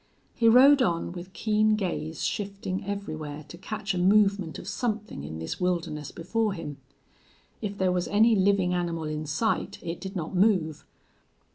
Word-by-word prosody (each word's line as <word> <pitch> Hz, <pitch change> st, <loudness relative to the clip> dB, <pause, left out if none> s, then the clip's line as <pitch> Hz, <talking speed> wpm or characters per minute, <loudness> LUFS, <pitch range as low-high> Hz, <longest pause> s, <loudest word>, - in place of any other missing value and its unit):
He 230 Hz, -1 st, +4 dB
rode 270 Hz, +4 st, +7 dB
on, 170 Hz, -8 st, 0 dB
with 175 Hz, +1 st, -8 dB
keen 215 Hz, +1 st, +2 dB
gaze 175 Hz, -5 st, -3 dB
shifting 200 Hz, -1 st, -3 dB
everywhere 155 Hz, -7 st, -5 dB
to 170 Hz, -, -8 dB
catch 205 Hz, +2 st, -4 dB
a 180 Hz, -, -1 dB
movement 195 Hz, -2 st, +3 dB
of -, -, -9 dB
something 215 Hz, -, -3 dB
in 80 Hz, +2 st, -6 dB
this 80 Hz, -, -5 dB
wilderness 165 Hz, -5 st, -1 dB
before 210 Hz, +5 st, -1 dB
him. 150 Hz, -5 st, -6 dB, 0.8 s
If 205 Hz, -2 st, -4 dB
there 185 Hz, -1 st, +2 dB
was 180 Hz, -1 st, 0 dB
any 220 Hz, +2 st, +4 dB
living 190 Hz, -2 st, +3 dB
animal 170 Hz, -2 st, -1 dB
in 155 Hz, 0 st, -4 dB
sight 220 Hz, +10 st, -1 dB
it 165 Hz, 0 st, -5 dB
did 195 Hz, +1 st, -6 dB
not 170 Hz, 0 st, -4 dB
move. 180 Hz, -6 st, +2 dB
185 Hz, 160 wpm, -27 LUFS, 165-210 Hz, 0.8 s, rode